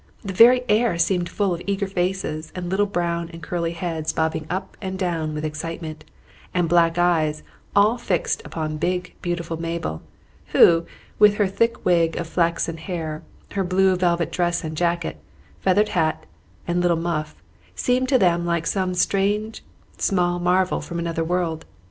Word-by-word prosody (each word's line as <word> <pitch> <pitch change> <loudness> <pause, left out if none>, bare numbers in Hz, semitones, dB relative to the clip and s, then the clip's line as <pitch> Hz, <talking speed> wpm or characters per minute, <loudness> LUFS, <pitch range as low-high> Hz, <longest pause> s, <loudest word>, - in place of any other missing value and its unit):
The 195 -2 -4
very 245 +5 +7
air 215 -4 +2
seemed 175 0 +1
full 200 -3 0
of 170 - -5
eager 200 0 0
faces 180 -4 -2
and 180 -1 -4
little 205 +2 +2
brown 170 -3 -2
and 165 -1 -11
curly 170 -1 -2
heads 165 -2 -3
bobbing 160 -1 -1
up 185 +2 -4
and 190 -1 -4
down 165 -5 -2
with 150 +1 -3
excitement, 155 0 -5 0.5
and 175 -2 +2
black 170 0 +3
eyes 160 -4 +2 0.3
all 210 +4 +4
fixed 180 -7 -1
upon 155 -1 -4
big 180 +3 -2
beautiful 170 -2 -3
Mabel, 165 - -3 0.5
who 165 0 +6 0.3
with 210 -1 +7
her 205 - +2
thick 230 +5 0
wig 170 -2 +3
of 170 - -2
flaxen 165 0 0
hair, 160 -2 -4 0.3
her 195 - -1
blue 185 +1 +3
velvet 170 -2 +1
dress 175 +1 0
and 155 0 -4
jacket, 170 - -1 0.4
feathered 205 +3 +3
hat, 160 -2 0 0.4
and 175 +1 +1
little 175 -1 +2
muff, 155 -2 -2 0.4
seemed 255 +1 +1
to 270 - +5
them 175 -5 +3
like 170 -1 -1
some 185 -1 0
strange 205 +4 0 0.4
small 175 -3 +1
marvel 180 +1 +2
from 170 - -6
another 165 -1 -1
world. 165 -1 -1
175 Hz, 160 wpm, -23 LUFS, 165-190 Hz, 0.5 s, very